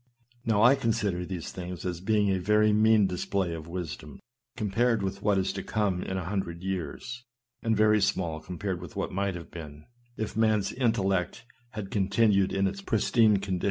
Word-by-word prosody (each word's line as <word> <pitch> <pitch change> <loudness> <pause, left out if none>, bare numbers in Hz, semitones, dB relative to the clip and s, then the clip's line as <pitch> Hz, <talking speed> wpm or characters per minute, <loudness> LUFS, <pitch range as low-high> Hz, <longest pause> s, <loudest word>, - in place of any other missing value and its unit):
Now, 110 -1 +3
I 125 +3 +8
consider 105 -8 -1
these 90 -3 -5
things 90 -2 -7
as 90 -1 -3
being 105 0 +2
a 95 - +1
very 105 +3 +3
mean 110 -1 +5
display 95 -1 -1
of 80 -1 -7
wisdom, 85 -4 -6 0.4
compared 115 0 +1
with 100 +1 -3
what 105 -1 +2
is 95 - 0
to 100 - -4
come 100 -3 -1
in 95 - -3
a 90 - -3
hundred 90 -2 -3
years, 95 - -4 0.4
and 115 -1 +1
very 110 0 +4
small 85 -5 0
compared 90 +2 -4
with 90 -4 -10
what - - -2
might 100 0 -1
have 85 -1 -9
been, 75 -3 -9 0.3
if 110 - -4
man's 110 -3 +2
intellect 110 -3 0 0.3
had 105 -3 -6
continued 100 0 +3
in 95 0 +1
its 100 0 -2
pristine 110 +1 +3
condition. 95 -2 -2
100 Hz, 180 wpm, -28 LUFS, 90-110 Hz, 0.4 s, I